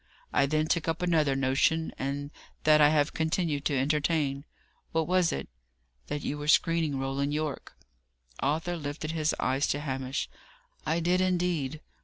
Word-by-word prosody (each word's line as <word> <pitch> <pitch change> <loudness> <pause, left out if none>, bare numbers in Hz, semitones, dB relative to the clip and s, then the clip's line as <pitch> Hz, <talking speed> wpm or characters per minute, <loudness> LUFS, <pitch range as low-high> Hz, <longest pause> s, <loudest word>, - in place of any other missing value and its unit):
I 140 - +3
then 155 +2 +1
took 165 0 0
up 165 +2 -1
another 155 -6 +2
notion, 135 +5 +2
and 140 +1 -3 0.3
that 155 0 +6
I 145 - +7
have 150 0 +2
continued 160 -2 -1
to 145 - +1
entertain." 145 0 0 0.5
"What 160 -1 +1
was 180 -1 +3
it?" 70 - -4 0.6
"That 145 - -3
you 150 - -3
were 145 - -5
screening 160 -2 +3
Roland 135 +2 -1
Yorke." 155 -2 -4 0.6
Arthur 160 +5 0
lifted 150 +1 -4
up - - -6
his 155 0 +1
eyes 135 +3 +1
to 145 - 0
Hamish. 135 -2 -3 0.6
"I 165 +1 +1
did 180 +2 +2
indeed. 175 -5 0
150 Hz, 160 wpm, -29 LUFS, 140-165 Hz, 0.6 s, I